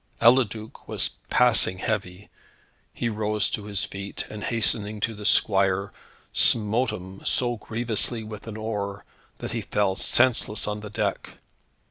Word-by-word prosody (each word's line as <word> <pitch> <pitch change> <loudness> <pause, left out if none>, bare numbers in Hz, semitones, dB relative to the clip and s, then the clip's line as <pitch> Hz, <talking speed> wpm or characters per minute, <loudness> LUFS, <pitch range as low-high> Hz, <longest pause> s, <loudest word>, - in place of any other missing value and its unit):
Eliduc 115 -3 +2
was - - +2 0.2
passing 120 -6 +4
heavy. 100 -2 -3 0.6
He 120 - -3
rose 105 -2 0
to 105 - -3
his 100 -2 -1
feet, 100 +1 -5
and 105 -1 -7
hastening 105 -1 0
to 115 +1 -1
his 105 0 +2
squire, 95 -1 +3 0.4
smote 115 +3 +3
him 95 +1 -8
so 120 -1 +1
grievously 115 +1 -1
with 110 0 -9
an 110 -1 -6
oar, 105 -2 -4 0.3
that - - -6
he - - -2
fell 100 -2 0
senseless 120 -4 +2
on 105 0 -2
the 105 0 -8
deck. 105 -1 -3
105 Hz, 140 wpm, -25 LUFS, 100-115 Hz, 0.6 s, passing